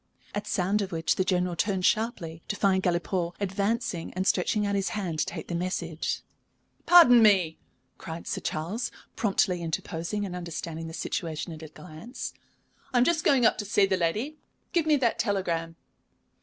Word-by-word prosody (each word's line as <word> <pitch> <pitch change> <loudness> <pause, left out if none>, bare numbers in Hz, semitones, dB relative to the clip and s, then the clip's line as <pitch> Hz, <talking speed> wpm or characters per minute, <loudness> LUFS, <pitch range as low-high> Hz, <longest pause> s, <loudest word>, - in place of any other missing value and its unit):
At 205 0 -3
sound 195 +3 +1
of 195 -1 -3
which 165 -1 +1
the 185 - +3
General 180 -1 0
turned 190 0 0
sharply, 180 -8 0
to 205 - -2
find 195 -2 +2
Galipaud 175 0 -1
advancing 200 -1 -1
and 185 +1 -1
stretching 205 +3 +2
out 200 - 0
his 195 -1 0
hand 175 -6 -3
to - - +2
take - - -6
the - - -4
message. 170 -2 -2 0.7
"Pardon 245 -10 +9
me," 190 -7 +4 0.4
cried 165 +1 -7
Sir - - -3
Charles, 180 +10 -2 0.3
promptly 190 -4 +1
interposing 170 +4 -3
and 180 -2 -5
understanding 165 -2 -5
the 160 - -7
situation 165 -1 -3
at 155 - -10
a 160 - -7
glance. 165 - -8 0.6
"I 250 - +1
am 245 - +6
just 315 +3 +2
going 265 -5 +4
up - - +3
to 205 - -3
see 205 0 +3
that 190 -1 0
lady. 215 - -1 0.4
Give 335 -3 +2
me 305 - +5
the 250 -5 +2
telegram." 170 -6 -1
185 Hz, 175 wpm, -27 LUFS, 170-210 Hz, 0.7 s, Pardon